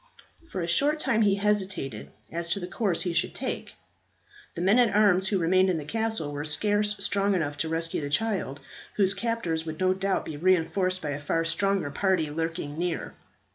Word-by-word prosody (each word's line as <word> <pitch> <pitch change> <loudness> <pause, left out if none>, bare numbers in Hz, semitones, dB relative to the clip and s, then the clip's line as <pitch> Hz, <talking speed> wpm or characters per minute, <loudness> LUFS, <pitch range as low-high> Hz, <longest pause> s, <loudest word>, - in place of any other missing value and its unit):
For 185 - -3
a 170 - -2
short 285 - +2
time 235 -6 +2
he 200 -2 +4
hesitated 195 - -1 0.2
as 170 +1 -3
to 200 - 0
the 180 - -4
course 185 0 -1
he 175 -2 -1
should 165 +1 0
take. - - -4 0.8
The 170 - -4
men 200 +7 +4
at 230 -5 +3
arms 195 -3 +4
who 195 - +1
remained 185 +2 +3
in 180 - +1
the 150 - -5
castle 220 -6 -2
were 145 0 -4
scarce 210 +7 +1
strong 200 0 +1
enough 145 -5 -1
to 160 - -1
rescue 165 0 -2
the 145 - -3
child, 185 -7 -1 0.3
whose 195 -2 +3
captors 195 -7 -1
would 155 0 -5
no 185 0 +3
doubt 190 +1 -1
be 155 - -6
reinforced 185 +2 +1
by 150 - -2
a 145 0 -4
far 165 +3 0
stronger 190 -2 0
party 180 -3 +1
lurking 160 -1 -3
near. 175 -1 -2
185 Hz, 195 wpm, -27 LUFS, 160-200 Hz, 0.8 s, he